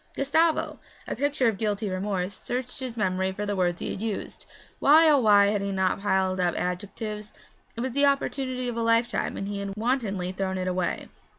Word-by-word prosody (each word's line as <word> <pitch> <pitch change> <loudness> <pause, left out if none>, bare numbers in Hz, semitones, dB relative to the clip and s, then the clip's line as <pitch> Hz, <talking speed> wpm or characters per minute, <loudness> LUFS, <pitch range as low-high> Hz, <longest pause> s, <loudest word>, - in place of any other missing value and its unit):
Gustavo, 315 +4 +1 0.3
a - - -3
picture 280 0 +1
of 215 -4 0
guilty 210 -1 -1
remorse, 190 0 -2
searched 250 +5 -5
his 255 -3 -5
memory 190 -2 0
for 205 +2 -4
the 205 0 -1
words 175 -2 0
he - - -3
had - - -5
used. 220 -3 -5 0.3
Why, 315 +3 +7
oh 295 -2 +6
why, 205 -4 +6
had 205 -1 0
he 200 0 -2
not 190 -1 +1
piled 190 -2 +1
up 175 -2 +1
adjectives? 210 +4 -4 0.4
It 235 - -4
was 260 +1 -2
the 280 +3 +3
opportunity 265 -2 -1
of 240 - -3
a - - 0
lifetime, 230 0 +1
and 195 - -3
he 200 0 -3
had 200 -1 -4
wantonly 215 -6 -1
thrown 190 0 -2
it 185 0 -2
away. 180 -1 -1
210 Hz, 200 wpm, -26 LUFS, 190-250 Hz, 0.4 s, Why